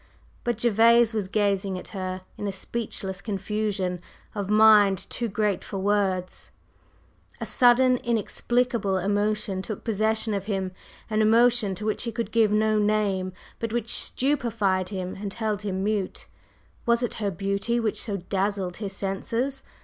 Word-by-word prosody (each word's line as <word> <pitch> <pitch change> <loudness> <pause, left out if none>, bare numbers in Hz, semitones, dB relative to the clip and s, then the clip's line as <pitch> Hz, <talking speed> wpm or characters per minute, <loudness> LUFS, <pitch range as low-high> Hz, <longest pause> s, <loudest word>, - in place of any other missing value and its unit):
But 240 0 -1
Gervase 235 0 +5
was 210 -4 -1
gazing 200 -2 0
at - - -9
her 185 -2 -4
in 205 - -4
a - - -1
speechless 195 -1 -5
confusion 195 -3 -2 0.3
of 205 -2 -4
mind 210 -2 +6
too 240 - -1
great 210 -2 0
for 200 - -6
words. 190 -2 -1 0.9
A - - -3
sudden, 250 +1 +5
inexplicable 235 -3 0
emotion 205 0 0
took 210 +1 -6
possession 220 0 0
of 200 -1 -2
him, 190 -3 -2 0.4
an 215 -1 +1
emotion 225 -2 +4
to 210 - -6
which 215 - -1
he 235 - -3
could 230 -2 -4
give 225 -2 +3
no 215 0 +3
name, 205 -3 +1 0.3
but 230 -1 -3
which 230 -1 -1
stupefied 220 -9 0
him 185 -2 -4
and 200 -1 -4
held 215 -3 -2
him 190 -2 -2
mute. 205 -2 -2 0.6
Was 235 +1 +3
it 240 - -1
her 205 - +1
beauty 200 +5 -1
which 220 -3 -1
so 205 -3 -1
dazzled 195 0 -2
his 200 -3 -5
senses? 230 +8 -2
210 Hz, 150 wpm, -26 LUFS, 195-225 Hz, 0.9 s, mind